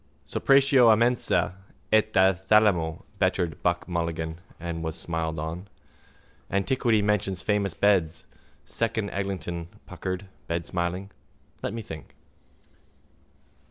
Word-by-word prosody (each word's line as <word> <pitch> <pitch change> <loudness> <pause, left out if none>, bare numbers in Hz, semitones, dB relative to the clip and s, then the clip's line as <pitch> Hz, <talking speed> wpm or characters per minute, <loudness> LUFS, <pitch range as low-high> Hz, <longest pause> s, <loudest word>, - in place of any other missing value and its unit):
—Separatio 135 -3 +5
a 110 - +5
mensa 120 -5 +2 0.4
et 110 0 +4
a 95 0 +6
thalamo, 95 -4 +2 0.2
bettered 90 -3 0
Buck 85 0 0
Mulligan 85 -1 -3 0.2
and 85 -1 -4
was 80 -1 -3
smiled 80 -1 -3
on. 80 +5 -5 0.8
—Antiquity 110 +2 +2
mentions 100 -3 0
famous 100 -5 0
beds, 85 -3 +2 0.4
Second 110 -3 -2
Eglinton 90 -4 -3 0.2
puckered, 95 +1 -5 0.2
bedsmiling. 85 +3 -2 0.5
Let 105 - -3
me 115 - -5
think. 80 -6 -10
95 Hz, 105 wpm, -26 LUFS, 85-105 Hz, 0.8 s, a